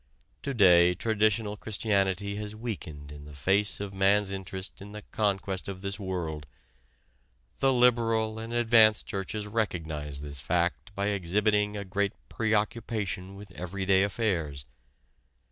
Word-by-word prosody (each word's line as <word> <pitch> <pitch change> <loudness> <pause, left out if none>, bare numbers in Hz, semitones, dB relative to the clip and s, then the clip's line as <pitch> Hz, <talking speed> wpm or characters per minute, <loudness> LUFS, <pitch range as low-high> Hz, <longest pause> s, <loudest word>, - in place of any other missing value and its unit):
To 140 -1 -3
day 90 -4 +6
traditional 110 0 +1
Christianity 100 -2 0
has 105 0 -5
weakened 80 -11 -6
in 75 0 -10
the 75 -1 -11
face 95 +9 +1
of 100 -1 -5
man's 100 +1 +3
interest 95 0 -6
in 100 +1 -10
the 105 0 -8
conquest 95 -2 -1
of 95 0 -6
this 100 +1 -2
world. 85 -7 -4 1.1
The 135 - +4
liberal 115 -3 +3
and 115 +1 -6
advanced 115 -2 +5
churches 100 +2 -4
recognize 80 -10 -2
this 70 -1 -1
fact 90 +6 -1
by 100 +1 0
exhibiting 105 +2 +1
a 100 - -5
great 100 +1 0 0.2
preoccupation 105 -3 -1
with 100 -1 -11
everyday 95 +2 +1
affairs. 90 - -1
100 Hz, 130 wpm, -28 LUFS, 90-110 Hz, 1.1 s, day